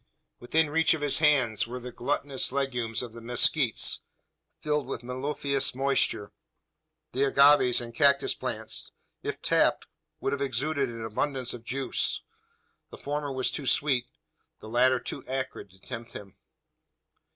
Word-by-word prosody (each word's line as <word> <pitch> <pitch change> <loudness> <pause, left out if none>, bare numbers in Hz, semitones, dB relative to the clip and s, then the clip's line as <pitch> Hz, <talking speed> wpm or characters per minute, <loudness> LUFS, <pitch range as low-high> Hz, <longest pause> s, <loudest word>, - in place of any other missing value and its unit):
Within 150 +5 +1
reach 165 +1 +3
of 155 - -7
his 145 0 +3
hand 135 -9 +3
were 125 +2 -6
the 125 0 -8
glutinous 130 +3 -1
legumes 125 -4 -1
of 120 -2 -8
the 115 - -10
mezquites, 120 +2 +2 0.6
filled 150 -3 -1
with 120 -3 -5
mellifluous 135 +2 -1
moisture. 135 -6 +1 0.8
The 135 +2 +1
agaves 140 -2 +5
and 120 -1 -7
cactus 140 +2 +3
plants, - - -4 0.3
if - - -5
tapped, - - +3 0.3
would 135 - -1
have 140 - -3
exuded 140 +1 0
an 115 -1 -6
abundance 130 +3 -2
of 120 -2 -9
juice. 135 +2 -1 0.7
The - - -11
former 145 0 -3
was 130 -1 0
too 140 - -5
sweet, 130 -4 +2 0.5
the 110 - -10
latter 125 +2 +3
too - - -7
acrid 130 -5 -4
to 95 +1 -21
tempt 120 +2 -8
him. 100 -2 -10
130 Hz, 145 wpm, -28 LUFS, 120-140 Hz, 0.8 s, agaves